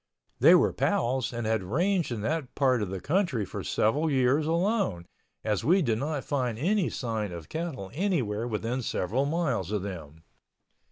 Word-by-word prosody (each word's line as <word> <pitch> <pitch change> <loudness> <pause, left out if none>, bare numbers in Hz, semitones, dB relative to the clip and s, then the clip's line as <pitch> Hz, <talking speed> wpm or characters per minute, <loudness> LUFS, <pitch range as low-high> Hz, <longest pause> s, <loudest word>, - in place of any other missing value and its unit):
They - - +8
were - - +3
pals 125 +1 0
and 120 -2 -4
had 110 -1 +1
ranged 170 - 0
in 115 -3 -3
that 145 +3 -2
part 130 -4 +2
of 105 - -2
the 95 0 -4
country 145 - 0
for - - -6
several 145 +9 +1
years 135 +2 +2
alone, 170 - 0 0.4
as 105 -3 0
we 180 +4 +4
did 115 -5 0
not 145 0 -2
find 125 -6 -1
any 185 - +1
sign 110 -5 -3
of 85 -3 -8
cattle 155 - -4
anywhere 130 - 0
within 115 +3 -2
several 120 +5 -1
miles 140 - -1
of 105 -3 -1
them. 80 -5 -8
125 Hz, 170 wpm, -28 LUFS, 105-160 Hz, 0.4 s, They